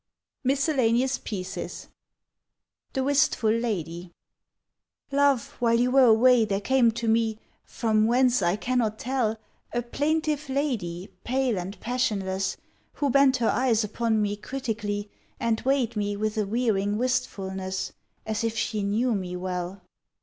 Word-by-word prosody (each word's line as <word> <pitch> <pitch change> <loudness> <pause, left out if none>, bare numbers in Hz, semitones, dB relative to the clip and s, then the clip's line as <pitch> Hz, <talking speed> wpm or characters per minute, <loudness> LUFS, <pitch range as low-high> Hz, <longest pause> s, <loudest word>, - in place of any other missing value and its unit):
MISCELLANEOUS 265 -2 +2
PIECES 190 -3 -6 1.0
THE 265 - 0
WISTFUL 280 -5 +2
LADY 180 -7 -2 1.0
"LOVE, 280 -2 +2
while 230 -1 +3
you 250 +1 +2
were 265 0 +6
away 240 +1 +6
there 200 -2 0
came 245 +3 +3
to 235 0 -3
me— 225 -1 +2 0.3
From 215 -2 +1
whence 250 0 +3
I 175 +1 +2
cannot 230 -1 0
tell— 240 -3 -1 0.4
A 240 - 0
plaintive 300 +3 -1
lady 215 - -2
pale 255 -1 0
and 190 +3 -6
passionless, 200 -6 -1 0.4
Who 285 -2 0
bent 275 0 +5
her 235 -2 +1
eyes 240 -3 +2
upon 220 +1 0
me 205 0 -1
critically, 210 -5 -4 0.3
And 230 -1 0
weighed 260 -3 +1
me 205 -1 -1
with 215 +1 -1
a 210 -2 0
wearing 210 -3 0
wistfulness, 190 -6 -2 0.3
As 220 +1 -2
if 225 0 -1
she 215 -2 -1
knew 220 +5 +1
me 185 -3 -3
well." 180 +1 -4
230 Hz, 135 wpm, -26 LUFS, 205-255 Hz, 1.0 s, were